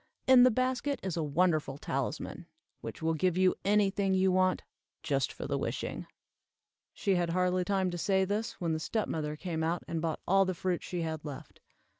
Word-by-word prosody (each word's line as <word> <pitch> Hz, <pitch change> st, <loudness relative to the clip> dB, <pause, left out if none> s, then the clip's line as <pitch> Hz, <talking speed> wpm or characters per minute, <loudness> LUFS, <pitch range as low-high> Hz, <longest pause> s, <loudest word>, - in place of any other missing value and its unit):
In 260 Hz, -1 st, +7 dB
the 255 Hz, -, +8 dB
basket 255 Hz, +3 st, 0 dB
is 190 Hz, -3 st, -2 dB
a 165 Hz, -, -1 dB
wonderful 155 Hz, -2 st, +1 dB
talisman, -, -, -4 dB, 0.3 s
which -, -, -8 dB
will 160 Hz, 0 st, +2 dB
give 180 Hz, +2 st, +1 dB
you 185 Hz, 0 st, +4 dB
any 205 Hz, 0 st, +3 dB
thing 195 Hz, -1 st, +1 dB
you 190 Hz, 0 st, +3 dB
want, 185 Hz, 0 st, +2 dB, 0.4 s
just 140 Hz, -5 st, 0 dB
for -, -, -7 dB
the -, -, -1 dB
wishing." -, -, -4 dB, 0.8 s
She 195 Hz, -, 0 dB
had 175 Hz, -2 st, +1 dB
hardly 180 Hz, +1 st, +1 dB
time 190 Hz, -1 st, 0 dB
to 175 Hz, -, -4 dB
say 190 Hz, +1 st, +2 dB
this, 210 Hz, +4 st, -2 dB
when 170 Hz, -2 st, -2 dB
the 160 Hz, -, -1 dB
step 215 Hz, +7 st, -1 dB
mother 150 Hz, -1 st, -3 dB
came 160 Hz, 0 st, -3 dB
out, 165 Hz, +2 st, -1 dB
and 165 Hz, -1 st, -2 dB
bought 160 Hz, -1 st, -2 dB
all 195 Hz, +1 st, +5 dB
the 185 Hz, -1 st, -2 dB
fruit 180 Hz, 0 st, -1 dB
she 175 Hz, -2 st, -4 dB
had 160 Hz, -1 st, -4 dB
left. 145 Hz, -3 st, -9 dB
180 Hz, 200 wpm, -31 LUFS, 160-195 Hz, 0.8 s, the